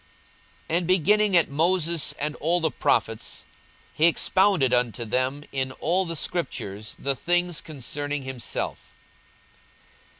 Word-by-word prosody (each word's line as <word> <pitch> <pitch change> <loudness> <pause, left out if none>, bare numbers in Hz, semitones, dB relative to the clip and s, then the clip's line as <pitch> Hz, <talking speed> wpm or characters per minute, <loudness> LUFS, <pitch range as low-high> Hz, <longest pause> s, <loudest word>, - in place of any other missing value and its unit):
42:024:027 165 - +2
And 175 - -4
beginning 195 +2 +4
at 170 - +3
Moses 170 +1 +2
and 150 +1 -3
all 170 +3 +1
the 160 -2 0
prophets, - - -1 0.5
he 160 - +4
expounded 180 -5 +3
unto 120 -1 +1
them 130 +5 -1
in 130 -1 -2
all 180 +7 0
the 165 -1 -4
scriptures 110 - -3
the 140 0 -1
things 175 +3 0
concerning 145 0 -5
himself. 130 -4 -5
155 Hz, 125 wpm, -25 LUFS, 130-175 Hz, 0.5 s, beginning